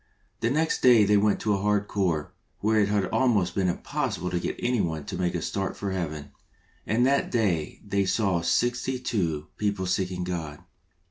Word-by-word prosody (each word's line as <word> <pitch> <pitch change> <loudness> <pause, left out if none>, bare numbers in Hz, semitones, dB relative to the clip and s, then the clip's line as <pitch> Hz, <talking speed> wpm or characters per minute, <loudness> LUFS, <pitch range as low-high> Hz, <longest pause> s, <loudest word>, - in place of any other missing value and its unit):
The 115 - +1
next 155 +4 0
day 120 -4 +6
they 105 +1 +4
went 105 0 +2
to 105 - +1
a 100 - -1
hard 105 0 +1
Corps, 90 -7 -1 0.3
where 110 +1 +2
it 100 - +3
had 105 -2 +1
almost 105 -9 +2
been 95 -2 +1
impossible 90 +1 -2
to 90 - 0
get - - -3
anyone 85 - -1
to - - -5
make 90 -1 -1
a. 85 - -2
start 95 -1 -3
for 100 -1 -3
Heaven, 75 -6 -4 0.6
and 115 +4 +2
that 140 +1 +2
day 100 -10 0
they 100 -1 0
saw 95 -3 +1
sixty 120 +8 0
two 90 -12 -2
people 100 -3 -1
seeking 90 0 -1
God. 80 -5 -4
100 Hz, 185 wpm, -26 LUFS, 90-110 Hz, 0.6 s, day